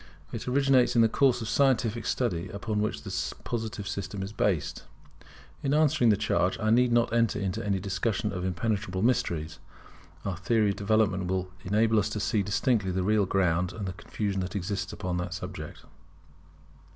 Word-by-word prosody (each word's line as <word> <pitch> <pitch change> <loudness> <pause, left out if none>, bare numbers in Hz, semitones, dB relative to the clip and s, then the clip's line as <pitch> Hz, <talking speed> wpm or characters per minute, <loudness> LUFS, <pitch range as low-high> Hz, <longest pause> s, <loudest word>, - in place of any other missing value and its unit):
It 115 - -6
originates 130 -2 +3
in 115 - +6
the - - +6
course 125 +1 +2
of - - -5
scientific 120 -2 +1
study 95 -8 -1
upon 105 +2 -2
which 105 - -2
the - - -3
Positive 110 -3 -4
system 100 0 -4
is 100 +2 -6
based. 95 -8 0 0.8
In 140 +1 +1
answering 145 -6 +4
the 105 - +4
charge, 95 -3 +1
I 110 0 +1
need 125 +1 +4
not 120 0 +2
enter 115 -2 +2
into 95 -3 -2
any 100 -1 0
discussion 100 +2 -1
of 90 -1 -3
impenetrable 95 +1 -1
mysteries. 80 -10 0 0.7
Our 95 -3 -2
theory 105 +2 +2
of - - -4
development 100 -3 +1
will 95 0 -2
enable 110 +3 +3
us 105 - 0
to 105 - -3
see 105 +1 +1
distinctly 105 +1 +1
the 90 0 -1
real 105 0 +2
ground 90 -1 +1
of 105 +1 -5
the 95 - -3
confusion 95 +2 -3
that 90 +3 -5
exists 100 +1 -2
upon 90 -1 -3
the 90 0 -2
subject. 90 -3 -7
105 Hz, 175 wpm, -28 LUFS, 95-115 Hz, 0.8 s, in